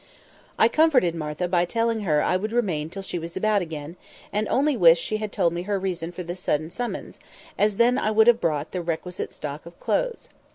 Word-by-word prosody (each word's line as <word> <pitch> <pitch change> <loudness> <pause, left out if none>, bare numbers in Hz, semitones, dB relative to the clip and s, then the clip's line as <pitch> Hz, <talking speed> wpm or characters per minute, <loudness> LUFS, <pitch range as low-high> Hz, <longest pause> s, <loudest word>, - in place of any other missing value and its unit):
I 220 - +6
comforted 255 - +3
Martha 155 +2 -3
by 175 -1 +2
telling 230 +3 0
her 155 -8 +1
I - - +1
would 210 +4 -2
remain 180 -11 0
till 195 +3 -7
she 180 - -4
was 165 +1 -7
about 210 +1 +2
again, 160 0 -7 0.4
and 210 +1 0
only 285 +2 +2
wished 170 -5 +6
she 215 - -1
had 215 -1 -4
told 170 -4 +1
me 170 - -3
her 200 - +1
reason 180 -3 -3
for 180 +1 -6
this 175 +2 -6
sudden 155 -2 -1
summons, 245 +3 -5 0.4
as 210 0 +2
then 245 +3 +4
I 215 - 0
would 220 0 +5
have 240 0 +5
brought 150 -2 -1
the 180 - -3
requisite 175 +1 -4
stock 150 0 -7
of 170 - -14
clothes. - - -1
185 Hz, 215 wpm, -24 LUFS, 165-220 Hz, 0.4 s, I